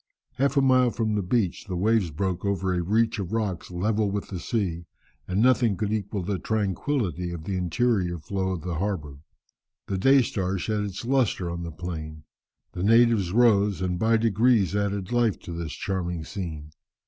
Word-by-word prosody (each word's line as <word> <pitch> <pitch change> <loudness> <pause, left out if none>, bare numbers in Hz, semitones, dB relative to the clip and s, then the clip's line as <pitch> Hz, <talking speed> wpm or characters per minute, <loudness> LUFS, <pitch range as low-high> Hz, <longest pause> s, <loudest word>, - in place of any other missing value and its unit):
Half 140 +1 +2
a 140 - +5
mile 130 -2 +4
from 110 -2 -1
the 105 - +1
beach, 95 -1 0
the 95 - -3
waves 105 0 +2
broke 90 +3 -2
over 95 -2 0
a 90 - 0
reach 110 +5 +1
of 95 +1 -4
rocks 105 -7 -2
level 105 +4 0
with 100 0 -4
the 95 - -5
sea, 85 -5 -2 0.4
and 95 +4 +1
nothing 120 -5 +3
could 105 +1 -1
equal 100 -2 -2
the 95 +1 -2
tranquillity 100 - -1
of 85 -2 -6
the 95 +3 -3
interior 90 0 0
flow 95 +4 -3
of 90 -4 -3
the 85 -3 -3
harbour. 80 -9 -3 0.7
The 95 - -2
day 135 +5 +5
star 95 -4 -2
shed 105 +2 -1
its 100 +3 -6
lustre 120 -9 +1
on 85 0 -4
the 85 -1 -5
plain; 80 -2 -6 0.5
the 90 - -6
natives 115 -3 +4
rose, 105 -3 +4
and 90 -1 -1
by 115 +1 +3
degrees 110 -2 +2
added 100 -1 -1
life 120 -4 +2
to - - -8
this 85 -2 -5
charming 90 -4 -3
scene. 80 -5 -6
100 Hz, 185 wpm, -26 LUFS, 90-110 Hz, 0.7 s, a